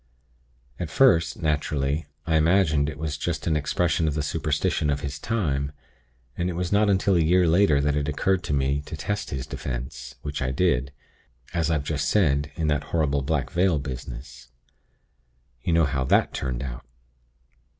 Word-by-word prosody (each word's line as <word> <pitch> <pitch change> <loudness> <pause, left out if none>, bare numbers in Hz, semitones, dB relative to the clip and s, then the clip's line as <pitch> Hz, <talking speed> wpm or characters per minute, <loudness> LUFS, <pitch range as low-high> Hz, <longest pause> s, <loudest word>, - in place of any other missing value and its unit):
At 85 -3 -3
first, 85 - +3
naturally, 75 -1 0 0.2
I 80 - +1
imagined 80 -3 +3
it 75 - -7
was 75 -1 -3
just - - -2
an 80 - +1
expression 85 +3 +1
of 75 - -1
the 75 - -1
superstition 75 +1 0
of 70 0 0
his 70 -1 -5
time; 75 -11 -1 0.6
and 85 +1 -1
it - - -3
was 90 0 -2
not 105 +1 +4
until 95 0 +3
a - - +4
year 90 +2 +4
later 80 -3 +4
that 70 0 +1
it 75 -1 -1
occurred 90 +5 +1
to - - -2
me 70 +1 +1
to 80 - -6
test 105 +7 -3
his 65 -2 -4
'Defense,' 60 0 -6
which 75 -1 -4
I 65 - 0
did, 65 -2 +1 0.6
as 85 -2 0
I've 75 -3 +1
just 70 -1 -1
said, 75 -7 +2
in 80 - -2
that 75 -2 0
horrible 70 -2 0
Black 70 0 -1
Veil 90 -2 +2
business. 65 -1 -7 1.1
You 85 - 0
know 80 -1 +4
how 65 -2 -1
that - - +3
turned 65 -1 -3
out. 60 -2 -6
75 Hz, 175 wpm, -25 LUFS, 70-85 Hz, 1.1 s, not